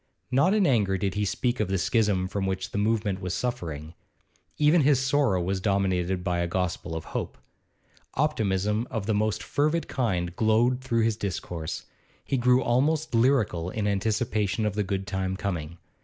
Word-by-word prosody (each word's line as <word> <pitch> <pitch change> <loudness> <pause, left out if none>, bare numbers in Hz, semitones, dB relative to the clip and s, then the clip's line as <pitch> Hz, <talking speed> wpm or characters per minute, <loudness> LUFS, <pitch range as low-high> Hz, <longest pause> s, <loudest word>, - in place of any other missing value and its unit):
Not 140 +10 +4
in 205 -3 +3
anger 105 - +2
did 95 0 -1
he 105 0 0
speak 120 +5 -1
of 110 - +1
the 95 0 0
schism 95 0 +1
from 95 0 -2
which 95 -1 -3
the 100 - -2
movement 105 -3 0
was 90 -1 -2
suffering; 85 -10 -4 0.6
even 150 +3 +4
his 140 -2 +4
sorrow 135 -7 +2
was 95 +2 -1
dominated 95 -2 0
by 90 -2 0
a 85 - 0
gospel 90 -2 -2
of 80 - -5
hope. - - -3 0.8
Optimism 110 -6 0
of 110 -4 -3
the 110 - +1
most 105 +1 0
fervid 155 +3 0
kind 90 -9 -1
glowed 115 +4 +2
through 115 -3 +1
his 110 -2 +1
discourse; 85 -5 -4 0.4
he - - -1
grew 125 0 +3
almost 145 +6 +1
lyrical 115 -8 +2
in 105 +2 -3
his 105 - +2
anticipation 105 0 0
of 105 - 0
the 105 - 0
good 95 0 -2
time 95 0 -2
coming. 85 -5 -4
105 Hz, 175 wpm, -27 LUFS, 95-120 Hz, 0.8 s, Not